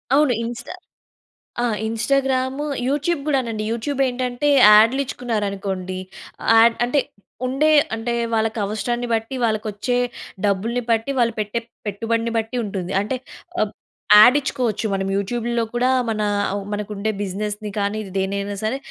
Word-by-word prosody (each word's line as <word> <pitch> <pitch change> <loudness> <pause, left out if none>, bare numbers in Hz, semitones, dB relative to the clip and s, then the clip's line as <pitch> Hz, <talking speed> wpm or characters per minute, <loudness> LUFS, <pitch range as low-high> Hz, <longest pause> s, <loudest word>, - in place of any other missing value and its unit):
అవును. 290 -3 +4
ఇన్‌స్టా 235 +7 -6 0.9
ఆ! - - +2 0.2
Instagram 260 +3 0 0.3
YouTube 295 +4 0
కూడానండి. 235 -7 0
యూట్యూబ్ 265 +5 -3
ఏంటంటే 250 +2 -2 0.2
యాడ్‌లు 220 +5 +6
ఇచ్చుకున్నారనుకోండి. 200 -6 -3 0.6
యాడ్ 230 +1 +6
అంటే 255 +4 +1 0.5
ఉండే 270 +5 +2 0.3
అంటే 225 +2 -3 0.2
వాళ్ళకి 220 0 0
అవసరాన్ని 240 +4 -2
బట్టి, 225 +3 -1
వాళ్ళకొచ్చే 215 +2 -1 0.5
డబ్బుల్ని 210 +5 0
బట్టి, 230 +3 +1
వాళ్ళు 235 -1 +2
పెట్టే 210 +2 -1 0.3
పెట్టుబడిని 230 +3 -1
బట్టి 225 +3 -2
ఉంటుంది. 190 -3 -4
అంటే 215 +6 -2 0.5
ఆహ్, 215 -1 0 0.5
యాడ్ 245 +5 +8
ఇచ్చుకోవచ్చు. 250 -6 -2
మనం 195 0 -1
యూట్యూబ్‌లో 235 +4 -1
కూడా 250 +1 +2 0.2
మన 215 -1 -1 0.3
అవ్ 200 0 -3
మనకు 210 0 -4
ఉండే 210 +2 -1
బిజినెస్‌ని 210 +2 -4
కానీ 205 +2 -1 0.2
దేనైనా 200 +1 -2
సరే 220 +5 0
225 Hz, 125 wpm, -21 LUFS, 205-245 Hz, 0.9 s, యాడ్